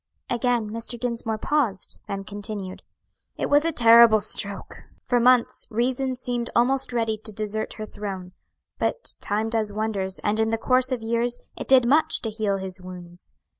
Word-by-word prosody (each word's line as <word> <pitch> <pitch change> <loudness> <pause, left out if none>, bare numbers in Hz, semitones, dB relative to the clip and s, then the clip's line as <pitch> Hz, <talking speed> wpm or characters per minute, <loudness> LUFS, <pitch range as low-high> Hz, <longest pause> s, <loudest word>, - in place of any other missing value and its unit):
Again 240 -3 0
Mr. 230 +1 -4
Dinsmore 230 -2 -2
paused, 220 -6 -1
then 195 0 -4
continued: 205 -2 -6 0.6
"It - - -2
was 290 +1 +5
a 330 - +1
terrible 230 -4 +7
stroke! 200 -1 -2 0.2
For 245 - +2
months, 250 0 +3
reason 255 +3 -1
seemed 245 -1 -3
almost 260 +2 +2
ready 225 -3 -1
to 215 0 -3
desert 215 +1 -3
her 215 - -6
throne; 195 -4 -7 0.5
but - - -1
time 215 +2 -1
does 220 -2 0
wonders, 200 -3 -2
and 210 +1 0
in 220 0 +2
the 225 - 0
course 255 +3 +2
of 245 -3 -2
years 235 +2 0 0.2
it - - -7
did 260 -2 +6
much 300 +5 +3
to 225 - -1
heal 210 -2 -1
his 190 -1 -6
wounds. 180 -1 -9
225 Hz, 170 wpm, -24 LUFS, 205-245 Hz, 0.6 s, terrible